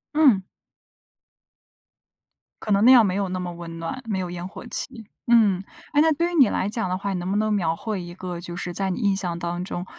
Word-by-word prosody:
嗯。 255 -12 +5 2.2
可 215 - -4
能 200 +1 +4
那 255 - +9
样 240 -4 +8
没 185 -1 0
有 200 -2 -1
那 185 0 -3
么 180 -1 -4
温 170 -1 -8
暖， 165 +11 -5
没 205 -4 -2
有 180 -1 -3
烟 175 0 -5
火 200 - -10
气， 235 -2 -5 0.2
嗯。 210 -6 +4 0.3
哎 290 - +5
那 320 +1 +4
对 340 +4 0
于 - - -3
你 270 -9 +6
来 195 - -1
讲 220 -3 -2
的 185 - -1
话， 200 +1 -3
你 180 - -2
能 175 +1 -4
不 200 - +1
能 215 0 +1
描 165 -5 +1
绘 210 +2 -4
一 175 0 -8
个 180 -2 -6
就 175 0 -7
是 175 0 -4
在 195 +1 -1
你 185 - -2
印 200 -3 +2
象 180 -3 -2
当 175 +1 -3
中 180 -1 -5
190 Hz, 250 characters per minute, -24 LUFS, 175-220 Hz, 2.2 s, 那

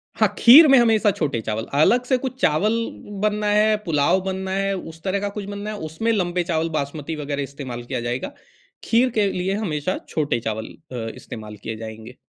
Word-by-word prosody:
हाँ, - - +4
खीर 295 +7 +9
में 270 - +7
हमेशा 220 -2 +4
छोटे 145 -10 -2
चावल, 110 +1 -3
अलग 235 - +4
से 255 0 +2
कुछ 260 0 -5
चावल 190 +9 +2 0.5
बनना 210 0 +1
है, 210 +1 +4
पुलाव 165 +2 +2
बनना 190 0 -3
है, 195 +1 0
उस 165 -3 -9
तरह 195 +1 0
का 205 0 -2
कुछ 205 -1 -6
बनना 205 +1 -6
है 215 - -6
उसमें 225 +9 -1
लंबे 180 -4 0
चावल, 165 -1 -1
बासमती 155 +1 -3
वग़ैरह 145 -1 -3
इस्तेमाल 130 -3 -7
किया 120 - -3
जाएगा। 120 - -3 0.5
खीर 245 +3 +3
के 205 - +3
लिए 185 +2 -1
हमेशा 180 -5 -2
छोटे 145 -6 0
चावल 110 -1 -4 0.3
अ, 115 -3 -4
इस्तेमाल 105 -1 -9
किए 115 - -4
जाएँगे। 110 +2 -9
175 Hz, 190 wpm, -22 LUFS, 140-210 Hz, 0.5 s, खीर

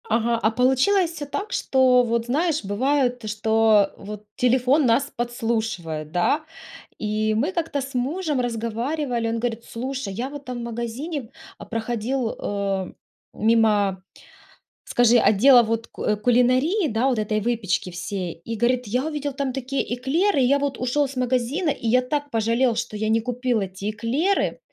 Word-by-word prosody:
Ага, 230 +1 +1
а 220 - +3
получилось 265 - +2
всё 300 -3 -6
так, 400 +9 -5
что 255 -2 +4
вот, 235 -1 -1
знаешь, 300 - 0
бывает, 250 +2 0
что 220 -1 +3
вот 210 +1 -8
телефон 255 +4 +3
нас 260 +4 +2
подслушивает, 220 -10 -3
да? 175 - +2 0.6
И 215 0 0
мы 275 - 0
как-то 325 -5 -2
с 270 +1 -7
мужем 295 +2 -1
разговаривали, 240 +2 -2
он 225 - -1
говорит: 230 0 -3
"Слушай, 255 -3 -5
я 240 +6 -3
в 290 - -10
этом 275 -3 -6
магазине, 235 +4 -4 0.3
а, - - -10
проходил, 230 +2 -2
э, 195 -2 -2 0.4
мимо, 210 -4 +2 0.8
скажи, 240 0 +4
отдела 245 +4 +6
вот 230 0 -2
ку 210 - -1
кулинарии, 255 - +2
да, 230 +3 +1
вот 250 -4 0
этой 215 0 0
выпечки 210 -5 -1
всей". 180 -1 -5
И 230 - -2
говорит: 245 +2 +1
"Я 250 +7 -1
увидел 295 -2 -3
там 270 -1 -2
такие 270 +1 -2
эклеры, 285 +8 +1
и 255 - +4
я 280 +3 +3
вот 280 -2 -2
ушёл 270 +3 +1
c 265 -1 -4
магазина, 255 +7 0
и 235 - -3
я 250 +3 +4
так 290 +3 -3
пожалел, 230 +1 +1
что 235 -2 -3
я 215 +1 -1
не 225 +1 +3
купил 245 0 -1
эти 195 +1 -4
эклеры". 255 - 0
240 Hz, 160 wpm, -23 LUFS, 220-270 Hz, 0.8 s, отдела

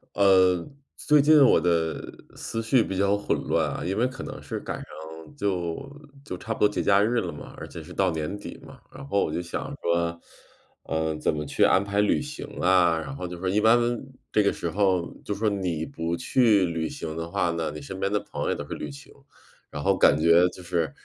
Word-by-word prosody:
呃， 95 -3 +4 0.3
最 150 -1 +4
近 155 +2 +6
我 - - +5
的 85 -2 +1 0.3
思 115 - -4
绪 115 +1 +3
比 95 - -4
较 100 +1 +3
混 105 - -1
乱 - - +1
啊。 - - -5
因 95 +3 -1
为 120 +3 +3
可 130 +1 -8
能 - - -7
是 - - -5
赶 - - -5
上 - - -9 0.5
就 95 +1 -2 0.4
就 90 - -5
差 115 +5 -4
不 - - -11
多 105 - +6
节 105 - -2
假 100 0 +4
日 115 +3 +2
了 - - -4
嘛， - - -10
而 - - -7
且 85 - -9
是 90 +3 -11
到 95 +1 +2
年 80 +5 -3
底 - - -9
嘛， 135 -2 -13
然 135 +1 -10
后 100 -6 +2
我 - - -2
就 80 - -2
想 90 +10 -5
说， 85 0 0 0.7
嗯， 80 -1 -1
怎 - - +1
么 75 0 -3
去 - - +1
安 95 - +4
排 100 0 0
旅 105 - +2
行 150 +1 -7
啊。 90 -2 +4
然 135 +12 -6
后 90 - -5
就 90 0 -7
说 95 +2 -4
一 100 +3 +2
般 110 +2 +6 0.5
这 105 - +3
个 100 - +3
时 85 - -4
候， 95 -3 +1
就 105 - -3
说 110 +1 -1
你 90 -6 -2
不 85 +1 -3
去 110 -3 +3
旅 80 -2 -2
行 80 -1 -6
的 80 0 -5
话 85 0 0
呢， 85 -2 -2
你 75 - -7
身 95 +7 -7
边 100 +1 -1
的 105 - +2
朋 - - -6
友 - - -1
也 - - +1
都 - - -6
是 - - -5
旅 75 - -5
行。 70 0 -12 0.6
然 - - -6
后 - - +3
感 70 - +4
觉 85 +3 +5
就 90 - -12
是， 85 -4 -1
95 Hz, 250 characters per minute, -26 LUFS, 85-105 Hz, 0.7 s, 近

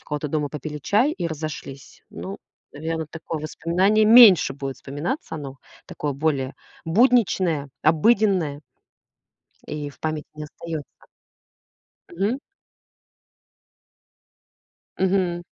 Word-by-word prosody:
у - - -26
кого-то 150 0 -3
дома, 150 0 -1
попили 150 +1 -6
чай, 215 - +2
и 180 - -3
разошлись. 155 -4 -7
Ну, 195 - -7 0.4
наверно, 160 +2 -4
такое 160 0 -6
воспоминание 185 +7 +2
меньше 220 - +8
будет 135 -1 -5
вспоминаться, 155 - -4
оно 140 -3 -7 0.3
такое 145 -1 -4
более 140 -2 -1 0.3
будничное, 180 - +2
обыденное. 165 -2 +3 1.1
И 150 -1 -4
в - - -21
памяти 155 -1 -3
не 150 0 -7
остается. 155 0 -7 1.3
Мгм. 200 +9 -1 2.6
Мгм. 185 -2 +1
160 Hz, 100 wpm, -23 LUFS, 150-190 Hz, 2.6 s, меньше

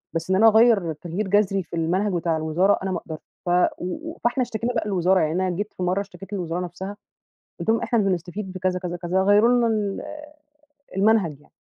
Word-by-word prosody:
بس 165 +2 -3
إن 190 - +3
أنا 225 +3 +6
أغير 220 -6 +5
تغيير 175 +6 -4
جذري 195 -1 +2
في 170 - -8
المنهج 185 +5 0
بتاع 170 -2 0
الوزارة 165 +6 +2
أنا 190 - -2
ما 180 - -1
أقدرش 160 -2 -7 0.3
ف 175 - -2 0.3
و 315 - -5
و - - -13
فإحنا 240 +2 +1
اشتكينا 240 0 -3
بقى 225 - 0
للوزارة 185 -1 +2
يعني 155 -1 +1
أنا 185 +1 0
جيت 205 +4 -3
مرّة 180 +2 +1
اشتكيت 200 0 -11
للوزارة 175 -3 -2
نفسها، 190 +4 -7 0.6
قلت - - -5
لهم 225 +1 +3
إحنا 235 - +1
بنستفيد 190 0 -2
بكذا، 185 0 -1
كذا، 180 -1 -4
كذا، 180 +2 0
غيروا 205 +4 +5
لنا 245 -1 +3
ال 210 -3 -1 1.0
المنهج 195 -8 +2
يعني. - - -26
190 Hz, 200 wpm, -23 LUFS, 175-210 Hz, 1.0 s, أنا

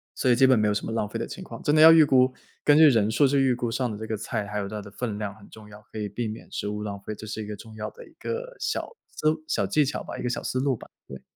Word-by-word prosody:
所 130 - +1
以 120 - +6
基 130 +2 +5
本 130 -2 +5
没 105 0 +2
有 105 - +2
什 105 - -2
么 - - -4
浪 115 -2 -1
费 115 +2 -5
的 115 - -3
情 185 - -8
况。 - - -9
真 150 - +2
的 - - +4
要 160 +1 +10
预 160 -1 +8
估， 130 -3 +4 0.3
根 145 - +5
据 155 0 +8
人 110 -5 +3
数 130 +6 +4
去 140 +1 +2
预 135 -2 +3
估 120 -1 -2
上 125 +2 -1
的 105 - -5
这 110 - -6
个 110 - -2
菜， 105 0 -3
还 105 0 -4
有 100 -1 -2
它 105 +1 -5
的 100 - -11
分 105 0 -4
量 105 -1 -3
很 100 -2 -16
重 110 -1 -13
要， 105 0 -12
可 110 - -6
以 105 -1 -3
避 115 +3 -3
免 110 +1 -8
食 - - -3
物 105 0 -4
浪 100 -1 -5
费， 110 - -4
这 110 +1 -9
是 110 0 -4
一 - - -9
个 105 - -5
重 110 +2 -13
要 - - -4
的 485 - -13
一 - - -20
个 - - -5
小 - - -3
思 155 - 0
路 155 0 -2
小 - - 0
技 150 -1 +3
巧 135 - -3
吧， - - -7
一 - - -6
个 125 - 0
小 120 - -2
思 130 - -2
路 135 0 +1
吧， - - -13 0.2
对。 65 -1 -9
115 Hz, 370 characters per minute, -26 LUFS, 105-135 Hz, 0.3 s, 要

